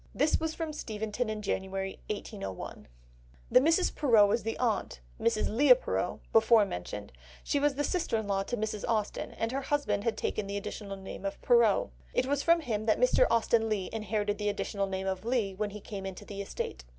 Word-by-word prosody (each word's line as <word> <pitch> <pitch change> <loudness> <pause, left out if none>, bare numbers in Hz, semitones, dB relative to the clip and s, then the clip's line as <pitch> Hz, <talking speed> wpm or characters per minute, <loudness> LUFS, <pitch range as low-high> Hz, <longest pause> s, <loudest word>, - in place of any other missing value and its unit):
This 295 +4 +3
was 320 0 -2
from 320 -2 -3
Steventon 220 -2 -3
in 215 -1 -4
January 190 -1 -3
1801. 205 - -6 0.6
The - - +8
Mrs. 325 +7 +3
Perrot 220 -8 +5
is 235 - +1
the 225 +1 -3
aunt, 225 - -1 0.2
Mrs. 230 -2 +1
Leigh 290 - +8
Perrot, - - -2
before 220 -1 +6
mentioned, 100 - -6 0.3
she 285 - +1
was 290 -1 +2
sister 345 - 0
in 220 - -2
law 195 -1 0
to 240 +5 -3
Mrs. 215 -1 -3
Austen, 215 -2 -1
and 225 +1 -2
her 270 +1 -1
husband 270 -8 0
had 230 - 0
taken 210 -2 -2
the 200 0 -3
additional 200 -1 -6
name 190 0 -8
of 195 - -3
Perrot. 235 - +4 0.2
It - - +2
was 280 +1 0
from 335 +2 +4
him 220 -6 -2
that 215 - +3
Mr. - - +4
Austen 225 -1 +2
Leigh 200 -4 -1
inherited 210 -1 -1
the 210 0 0
additional 200 -1 -2
name 190 0 -3
of 190 0 -2
Leigh 230 -4 0
when 210 +2 -2
he 210 +1 -8
came 195 -1 -6
into 190 -1 -8
the 200 -1 -6
estate. 65 - -5
215 Hz, 200 wpm, -30 LUFS, 200-245 Hz, 0.6 s, The